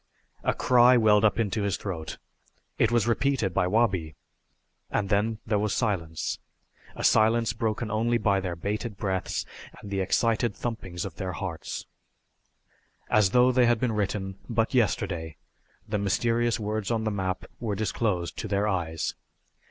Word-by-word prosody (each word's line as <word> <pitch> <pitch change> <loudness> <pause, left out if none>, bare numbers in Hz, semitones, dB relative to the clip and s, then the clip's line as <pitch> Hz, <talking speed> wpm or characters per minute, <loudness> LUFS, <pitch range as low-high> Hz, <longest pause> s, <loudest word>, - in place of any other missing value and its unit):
A - - +1
cry 125 0 +5
welled 105 -2 +5
up 105 - +3
into 110 -1 0
his 100 -1 0
throat. 85 -6 -5 0.6
It 115 - +3
was 120 -3 +3
repeated 120 -4 +1
by 90 - +2
Wabi. 95 -7 +1 0.7
And 100 -2 -1
then 105 +2 +1
there 105 -2 +1
was 105 -1 0
silence 85 -9 -1 0.6
a - - -6
silence 115 +1 +4
broken 110 -1 -2
only 115 +2 +2
by 100 -3 +2
their 90 -2 -3
bated 105 +4 -3
breaths 95 -3 -2 0.3
and 100 - -10
the 100 - -1
excited 115 +4 +1
thumpings 95 -7 -4
of 90 -5 -8
their 95 -1 -3
hearts. 90 -5 -5 1.3
As 105 -3 +5
though 125 +4 +5
they 125 -1 +4
had 120 -1 +3
been 125 -1 +1
written 100 -2 -2
but 115 +1 0
yesterday, 95 - 0 0.5
the 105 - -1
mysterious 115 +4 +1
words 105 -1 -2
on 115 -2 0
the 110 - 0
map 95 -2 -2
were 110 -4 -2
disclosed 100 -4 -1
to - - -3
their 100 +1 +1
eyes. 85 -5 -1
105 Hz, 155 wpm, -27 LUFS, 95-115 Hz, 1.3 s, cry